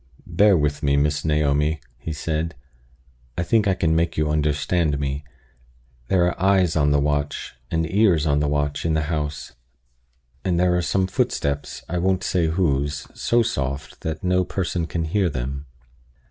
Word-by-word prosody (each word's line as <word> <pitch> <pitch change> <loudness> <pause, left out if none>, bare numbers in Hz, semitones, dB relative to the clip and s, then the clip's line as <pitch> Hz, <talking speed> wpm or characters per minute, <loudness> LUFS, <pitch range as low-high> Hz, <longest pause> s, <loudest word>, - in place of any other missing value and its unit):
"Bear 95 +3 +4
with 75 0 0
me, 70 -1 +2
Miss 75 +1 +1
Naomi," 75 0 +1 0.2
he 80 - -5
said. 80 +2 -2 0.8
"I 85 - 0
think 105 +3 +2
I 95 - +3
can 80 -3 +1
make 85 +1 0
you 75 -1 +1
understand 75 +1 +1
me. 70 0 -3 0.8
There 90 +2 +3
are 90 0 -2
eyes 95 -3 +3
on 75 -2 +3
the 75 0 +3
watch, 75 0 -1 0.2
and 80 -1 0
ears 95 -4 +3
on 70 -1 +2
the 75 - +1
watch, 70 0 -1
in 80 -1 +1
the 80 - +1
house; 75 -1 -3 0.9
and 85 -2 +1
there 90 0 +3
are 90 - +2
some 95 +2 +1
footsteps 70 -5 -2
I 90 +2 -2
won't 95 +1 +1
say 85 -3 +1
whose 75 -4 0
so 120 0 +2
soft, 70 - -3
that 80 -1 -4
no 90 0 +2
person 90 -2 -2
can 85 -1 -2
hear 90 +3 +1
them." 70 +1 -4
80 Hz, 170 wpm, -23 LUFS, 75-90 Hz, 0.9 s, Bear